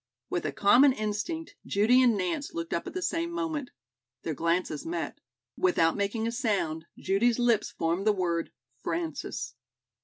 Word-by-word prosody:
With 175 - -1
a - - -2
common 250 +7 +6
instinct, 215 +10 -3
Judy 225 +6 +4
and 240 -4 +4
Nance 200 - -2
looked 335 0 -3
up - - -2
at - - -7
the 370 - -2
same 335 -1 0
moment. 320 -6 -2 0.5
Their 160 - -2
glances 170 0 0
met. 165 -3 -4 0.4
Without 165 -3 +3
making 205 +2 -1
a 230 - 0
sound, 195 -9 -1
Judy's 225 +5 +2
lips 240 -3 +2
formed 170 +5 -1
the - - +7
word 175 -4 -1 0.3
"Frances." 160 -6 -3
205 Hz, 155 wpm, -29 LUFS, 170-250 Hz, 0.5 s, the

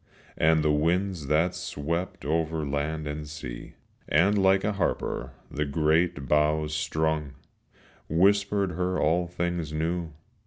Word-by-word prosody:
And 80 0 +3
the 75 - +3
winds 85 +1 0
that 80 +5 +2
swept 85 -1 -4
over 80 0 0
land 75 +2 -2
and 75 0 -5
sea, 65 -6 -8 0.3
And 90 +7 +4
like 95 -1 +4
a 105 - +1
harper 100 - -2 0.2
the 75 0 -1
great 80 +1 +1
boughs 75 0 +2
strung, 80 -2 -1 0.8
Whispered 100 +3 +3
her 90 +2 -1
all 85 +3 +2
things 85 -2 -2
new. 80 +1 -2
80 Hz, 125 wpm, -27 LUFS, 75-90 Hz, 0.8 s, And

